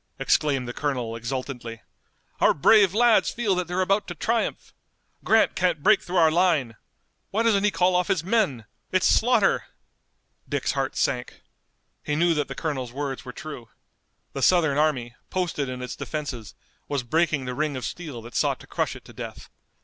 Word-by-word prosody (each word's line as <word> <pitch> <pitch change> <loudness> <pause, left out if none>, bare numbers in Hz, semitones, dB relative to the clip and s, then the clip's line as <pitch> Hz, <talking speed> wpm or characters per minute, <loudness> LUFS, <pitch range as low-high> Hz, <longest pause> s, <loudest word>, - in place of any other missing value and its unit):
exclaimed 135 -4 +1
the 120 - -5
colonel 125 -6 -2
exultantly. 120 -1 -5 0.6
"Our - - +4
brave 200 +6 +5
lads 235 0 +4
feel 225 -5 0
that 180 -1 -1
they're 180 +2 0
about 195 +2 +1
to 175 - -6
triumph! 230 +7 -2 0.5
Grant 220 0 +4
can't 175 -5 0
break 210 -1 +5
through 180 - -6
our 160 -2 +5
line! 160 -9 +2 0.5
Why 220 +3 0
doesn't 210 -4 +3
he 210 - +4
call 180 -2 +2
off 180 0 +2
his 170 -4 0
men? 185 - 0 0.3
It's - - +2
slaughter!" - - +3 0.8
Dick's - - 0
heart - - -2
sank. - - -1 0.6
He 150 - -2
knew 170 +2 +3
that 150 -3 -1
the 135 - -7
colonel's 135 -7 -3
words 135 0 -4
were 125 - -6
true. 125 -4 -9 0.6
The 135 - -4
Southern 155 -3 +3
army, 130 -6 0 0.2
posted 170 -7 -2
in 125 0 -5
its 125 - -5
defenses, 140 - -6 0.3
was 140 -3 -2
breaking 155 +1 +1
the 125 - -3
ring 150 0 -1
of 130 - -5
steel 145 -10 -6
that 120 +1 -11
sought - - +1
to - - -13
crush - - -2
it - - -13
to - - -13
death. - - -8
150 Hz, 180 wpm, -25 LUFS, 130-180 Hz, 0.8 s, brave